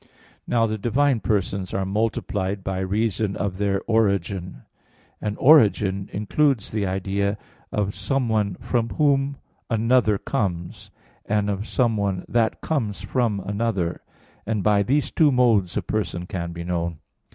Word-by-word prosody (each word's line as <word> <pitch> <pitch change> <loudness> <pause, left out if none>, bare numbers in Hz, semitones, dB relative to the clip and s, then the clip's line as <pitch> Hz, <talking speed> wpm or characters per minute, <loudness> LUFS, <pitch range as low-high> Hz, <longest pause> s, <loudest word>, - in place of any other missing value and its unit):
Now 115 -1 +2
the 110 -1 -2
divine 130 +4 +2
persons 95 -1 -1
are 95 0 0
multiplied 100 -1 -1
by 95 -1 -2
reason 100 +1 0
of 95 -2 -3
their 100 -1 0
origin: 100 - 0 0.6
and 105 -1 -3
origin 105 -9 +4
includes 115 +3 +1
the 105 -3 -1
idea 100 +2 -1 0.3
of 100 -1 -1
someone 110 -2 0
from 115 +2 -1
whom 140 -1 +1 0.3
another 115 -2 +3
comes, 90 -4 -3 0.4
and 105 0 +1
of 100 +3 -4
someone 100 -7 0
that 115 -2 +1
comes 110 -11 -2
from 105 -1 0
another, 100 -3 -2 0.4
and 110 -2 -2
by 105 -1 +4
these 135 +8 +1
two 155 -3 +4
modes 115 -8 +3
a - - -1
person 100 -5 -2
can 85 -2 -4
be 85 0 -6
known. 85 -2 -2
105 Hz, 135 wpm, -23 LUFS, 95-115 Hz, 0.6 s, origin